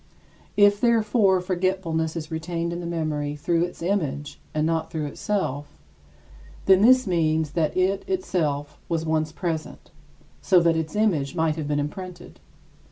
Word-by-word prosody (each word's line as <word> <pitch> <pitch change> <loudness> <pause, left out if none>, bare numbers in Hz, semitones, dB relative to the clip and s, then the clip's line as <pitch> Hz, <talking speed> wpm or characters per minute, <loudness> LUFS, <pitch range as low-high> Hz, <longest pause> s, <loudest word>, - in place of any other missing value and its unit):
If, 205 0 +5
therefore, 215 -5 +3
forgetfulness 180 -3 -1
is 160 -1 -5
retained 165 +1 -3
in 170 - -4
the 170 - -5
memory 155 -3 -2
through 170 +3 +1
its 175 -1 -9
image 145 -6 -2
and 155 0 0
not 160 0 0
through 155 -2 -3
itself, 145 -3 -3 0.9
then 190 0 +6
this 255 +3 +6
means 160 -4 +1
that 160 +1 0
it 190 +2 +1
itself 155 - -1
was 165 -1 -1
once 155 -1 0
present, 160 -2 -5 0.5
so 185 -2 +5
that 170 -1 +3
its 160 +3 -3
image 170 -11 +1
might 160 -1 +1
have 155 -2 -4
been 145 0 0
imprinted. 175 +4 -6
165 Hz, 150 wpm, -24 LUFS, 155-185 Hz, 0.9 s, then